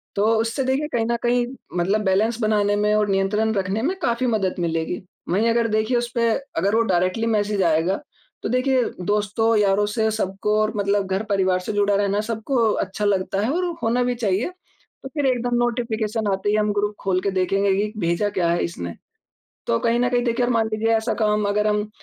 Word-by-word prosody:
तो 200 +1 +2
उससे 230 +4 -1
देखिए 265 +3 0
कहीं 225 -1 +1
न 235 0 0
कहीं 240 0 +2 0.3
मतलब 195 +5 +1
बैलेंस 220 +5 +1
बनाने 205 -1 +2
में 210 +1 +1
और 210 -1 +1
नियंत्रण 200 +3 +1
रखने 195 +3 -1
में 365 +6 0
काफ़ी 245 -3 0
मदद 205 -5 0
मिलेगी। 165 +1 -2 0.3
वहीं 215 +6 +2
अगर 230 0 +2
देखिए 215 +3 +1
उसपे 235 -1 0 0.3
अगर 200 +3 +1
वो 230 - +4
डायरेक्टली 185 +6 +1
मैसेज़ 205 -3 +1
आएगा 165 - +1 0.4
तो - - -2
देखिए 255 0 +2 0.2
दोस्तों, 210 +3 +1
यारों 205 0 +3
से 220 +1 0
सबको 210 0 -1
और 215 +1 0
मतलब 200 -1 +1
घर 195 +3 0
परिवार 190 -2 +2
से 185 - -5
जुड़ा 205 0 +2
रहना 200 +1 +1
सबको 230 +4 -2 0.3
अच्छा 205 +2 -4
लगता 195 -1 0
है 260 - 0
और 360 +3 0 0.2
होना 240 +2 +2
भी 245 0 0
चाहिए। 215 - 0 0.5
तो 270 - -6
फिर 290 -3 -1
एकदम 245 -1 0
नोटिफ़िकेशन 225 -3 -1
आते 195 +2 -1
ही 210 - +2
हम 210 -1 +1
ग्रुप 205 0 -1
खोल 185 -1 +1
के 200 - -1
देखेंगे 195 +1 +1
कि 210 +1 -1
भेजा 170 +5 +1
क्या 170 -2 +2
है 170 - +1
इसने? 85 - -6 0.7
तो 115 - +2
कहीं 235 +1 +1
न 245 - +2
कहीं 245 -1 +1
देखिए 240 +1 +1
मान 230 -2 +1
लीजिए 225 +1 +2
ऐसा 220 +1 -1
काम 210 -1 +2
अगर 210 +1 +1
हम 210 0 0
210 Hz, 200 wpm, -22 LUFS, 195-230 Hz, 0.7 s, वो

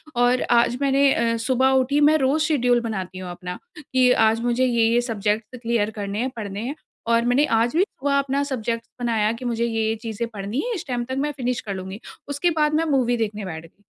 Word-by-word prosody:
और 245 +1 +3
आज 240 +1 +3
मैंने 275 0 +4
अ, 230 0 +1
सुबह 260 +3 +2
उठी 280 +3 +1
मैं 305 +2 +6
रोज़ 290 +3 +2
शेड्यूल 245 -6 +2
बनाती 190 -5 -4
हूँ 180 -1 -6
अपना, 180 0 -7 0.2
कि 255 -3 +2
आज 225 -1 +3
मुझे 245 +2 +2
ये-ये 235 -1 +3
सब्जेक्ट 220 0 -2
क्लियर 230 -3 0
करने 205 0 -4
हैं, 260 +2 0
पढ़ने 205 -2 -5
हैं, 285 - -4 0.3
और 230 0 +3
मैंने 260 +5 +3
आज 230 +1 +1
भी 365 - +5
सुबह 280 -6 -1
अपना 275 0 0
सब्जेक्ट 230 -4 -3 0.2
बनाया 225 -3 +1
कि 245 +2 -8
मुझे 235 -1 0
ये-ये 225 -1 0
चीज़ें 230 0 -3
पढ़नी 205 +6 -4
है, - - -2
इस 350 - -6
टाइम 245 -1 -2
तक 260 +1 -4
मैं 295 +1 0
फिनिश 250 -1 -1
कर 200 - -5
लूँगी। 190 +2 -7 0.3
उसके 285 +5 +1
बाद 300 0 +2
मैं 325 +2 +2
मूवी 255 -5 +2
देखने 210 -2 -3
बैठ 160 -2 -6
गई। 200 +5 -22
240 Hz, 215 wpm, -23 LUFS, 220-265 Hz, 0.3 s, मैं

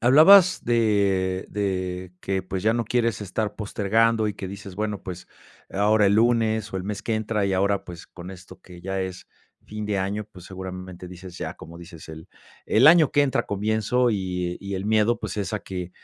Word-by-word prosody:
hablabas 165 +9 +7
de 100 -5 +1
de 95 -3 -3
que, 95 -1 -2
pues, 95 0 -5
ya 110 - +3
no 115 0 -1
quieres 115 -2 0
estar 105 +1 -3
postergando, 110 +2 +1
y 105 - -4
que 95 - -6
dices, 100 -1 -9
bueno, 105 -1 -3
pues, 90 -1 -8 0.4
ahora 105 +1 +3
el 100 - +3
lunes 110 -2 +2
o - - -2
el 95 - -4
mes 105 0 -4
que 115 - -1
entra. 105 -2 -1
Y 95 - -1
ahora, 100 +1 +1
pues, 85 -1 -10
con 90 +1 -10
esto 90 0 -13
que 90 -1 -14
ya 95 +1 -3
es 95 -1 -6 0.4
fin 105 0 -6
de 100 -2 -1
año, 100 +3 -2
pues, 90 -3 -13
seguramente 95 -1 -8
dices 90 0 -11
ya. - - -5
Como 85 +1 -11
dices, 85 -2 -12
el 80 +2 -10 0.4
el 120 +6 +4
año 160 -2 +7
que 145 - +3
entra 140 -2 +1
comienzo, 110 +4 +1
y 90 -3 -2
y 100 0 -5
el 95 - -4
miedo, 110 +2 +2
pues, - - -5
es 100 +1 -3
a 105 - -1
que 90 -2 -6
100 Hz, 200 wpm, -24 LUFS, 95-110 Hz, 0.4 s, hablabas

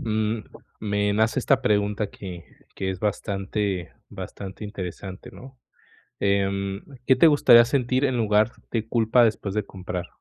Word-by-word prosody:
mm, 110 0 -1 0.4
me 105 -1 0
nace 110 +4 +2
esta 135 +1 +3
pregunta 105 -2 +1
que 90 -5 -9 0.3
que 95 -1 -2
es 95 -1 -6
bastante, 100 -2 -2 0.2
bastante 95 +1 -8
interesante, 95 -2 -7
¿no? 130 0 -13 0.6
Em, 100 0 0 0.2
¿qué 130 - +5
te 145 +6 +6
gustaría 125 -6 +7
sentir 125 +1 0
en 130 -3 0
lugar 110 0 +3 0.2
de 115 -1 -2
culpa 115 +1 +3
después 110 -3 0
de 105 0 0
comprar? 90 -2 -6
105 Hz, 140 wpm, -24 LUFS, 100-115 Hz, 0.6 s, gustaría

